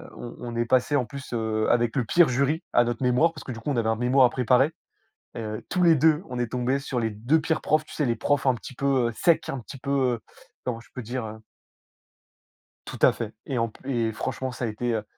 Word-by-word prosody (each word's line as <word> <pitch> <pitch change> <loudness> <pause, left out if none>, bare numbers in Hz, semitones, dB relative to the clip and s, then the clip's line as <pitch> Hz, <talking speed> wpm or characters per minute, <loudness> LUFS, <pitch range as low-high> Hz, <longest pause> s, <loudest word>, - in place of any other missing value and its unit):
on 120 - -8
on 120 -1 -6
est 120 0 +1
passés, 130 +4 +2
en 130 -3 +2
plus, 135 +2 -9
heu, 110 -2 0
avec 120 -1 +2
le 130 -4 +1
pire 170 +8 +5
jury 140 +6 +1
à 120 - +6
notre 120 0 -3
mémoire 125 +7 +3
parce - - -10
que, - - -6
du 115 - -6
coup, 145 +5 -3
on 135 - -1
avait 110 -1 +1
un 110 - +2
mémoire 125 +3 +4
à - - -4
préparer. 130 +5 +2 0.6
Heu, 110 -1 -5
tous 180 - +1
les 165 -1 +7
2, 155 +2 +3
on 125 -1 -5
est 120 - 0
tombés 125 +2 0
sur 135 -2 -3
les 115 -2 0
2 120 +10 +1
pires 160 +1 0
profs. 155 +1 +1
Tu - - -12
sais 150 - 0
les 115 - 0
profs 140 +4 0
un 130 - +4
petit 115 +4 -10
peu, 135 -3 +1
heu, - - -9
secs, 170 +6 +2
un 135 - -3
petit 135 +3 -10
peu, 140 +1 -5 0.3
heu, - - -15 0.4
comment 120 -2 -3
je 115 - -18
peux 130 - -5
dire, 120 +1 -4
heu? 110 0 -8 1.5
Tout - - -7
à - - +7
fait. 110 -2 -5
Et 135 -3 -2
en 115 0 +1
p 130 +5 -14 0.2
et - - -3
franchement 130 +4 -3
ça 125 - -4
a - - 0
été, 115 +2 -2
heu, 110 - -1
125 Hz, 260 wpm, -26 LUFS, 115-140 Hz, 1.5 s, les